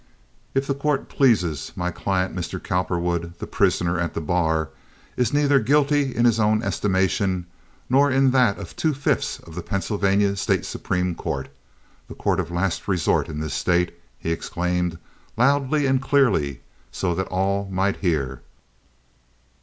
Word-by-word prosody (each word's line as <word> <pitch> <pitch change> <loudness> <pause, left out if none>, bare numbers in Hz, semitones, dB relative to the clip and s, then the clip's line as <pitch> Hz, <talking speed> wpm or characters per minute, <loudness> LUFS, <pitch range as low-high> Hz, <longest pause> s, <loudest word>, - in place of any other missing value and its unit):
"If 135 +1 +2
the 140 - 0
court 140 0 -1
pleases, 90 - +1
my 90 0 -2
client, 95 +1 -1
Mr. 90 -2 -4
Cowperwood, 85 -1 -2
the - - -5
prisoner 85 0 +1
at 85 0 -2
the - - -1
bar, 80 -1 0 0.5
is 125 -3 +1
neither 145 -1 +4
guilty 140 +2 +2
in 120 +2 +2
his 115 -2 +4
own 110 +1 +2
estimation, 95 -3 0 0.4
nor 140 +3 +4
in 135 0 +3
that 125 -6 +3
of 100 -4 -9
two 155 -3 0
fifths 140 - 0
of 80 - -14
the 90 - -4
Pennsylvania 100 +1 +1
State - - 0
Supreme 90 -1 -2
Court—the 65 -4 -8
court 95 -2 0
of 85 -3 -2
last 85 +1 -2
resort 90 -5 +1
in 75 -1 -4
this 80 -3 -3
State," 90 +2 +1 0.2
he 80 - -3
exclaimed, 90 +1 -1 0.4
loudly 140 +3 +2
and 135 -1 +2
clearly, 105 - +2 0.3
so 90 -2 -1
that 95 +2 -2
all 100 +1 -1
might 95 +1 0
hear. 70 -8 -1
95 Hz, 150 wpm, -23 LUFS, 85-125 Hz, 0.5 s, neither